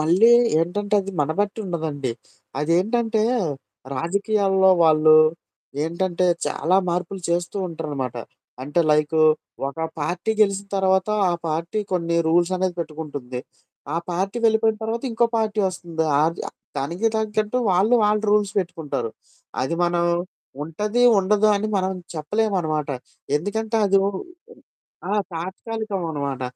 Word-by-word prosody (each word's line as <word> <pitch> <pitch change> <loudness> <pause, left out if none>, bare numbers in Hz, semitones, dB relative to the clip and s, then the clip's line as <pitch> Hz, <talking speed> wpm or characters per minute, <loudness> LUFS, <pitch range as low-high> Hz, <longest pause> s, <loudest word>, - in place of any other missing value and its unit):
మళ్ళీ 180 +9 +5 0.3
ఏంటంటే 205 +5 -1
అది 195 +1 -7
మనబెట్టి 195 +9 -1
ఉండదండి. 155 -7 -3 0.5
అదేంటంటే 215 +8 +1 0.7
రాజకీయాల్లో 195 - +2
వాళ్ళు 155 0 +6 0.7
ఏంటంటే 175 +2 0 0.2
చాలా 180 +4 +1
మార్పులు 180 +2 -2
చేస్తూ 175 +2 -1
ఉంటరనమాట. 145 -7 -4 0.5
అంటే 145 +6 0
లైకు 150 +1 +2 0.5
ఒక 140 - -10 0.2
పార్టీ 175 +7 -2
గెలిసిన 200 -1 +2
తర్వాత 190 0 +2 0.2
ఆ - - +1 0.2
పార్టీ 165 +6 -2
కొన్ని 170 -2 0
రూల్స్ 175 +2 +3
అనేది 185 -1 -1
పెట్టుకుంటుంది. 145 -6 -6 0.5
ఆ - - 0
పార్టీ 195 +6 -2
వెళ్ళిపోయిన 220 0 +3
తర్వాత 225 +1 -2
ఇంకో 235 +1 +3
పార్టీ 220 -1 -1
వస్తుంది. 170 -3 -4 0.2
ఆర్ 160 +2 +2 0.4
దనికి 170 +11 0
దానికి 220 -1 -2
తగట్టు 215 +3 +1
వాళ్ళు 195 +6 +3
వాళ్ళు 210 0 +2
రూల్స్ 205 -1 +2
పెట్టుకుంటారు. 160 - -3 0.5
అది 130 +6 -1
మనం 175 0 +1 0.6
ఉంటది 210 +10 -1 0.2
ఉండదు 205 +2 +3
అని 210 +2 -2
మనం 190 0 0 0.2
చెప్పలేమనమాట. 160 -3 -1 0.5
ఎందుకంటే 220 +7 -2
అదు 195 0 +4
ఉ - - -1 1.0
ఆ! - - 0 0.2
తాత్కాలికం 195 +4 -4
అనమాట. 140 -3 -3
180 Hz, 120 wpm, -23 LUFS, 160-210 Hz, 1.0 s, వాళ్ళు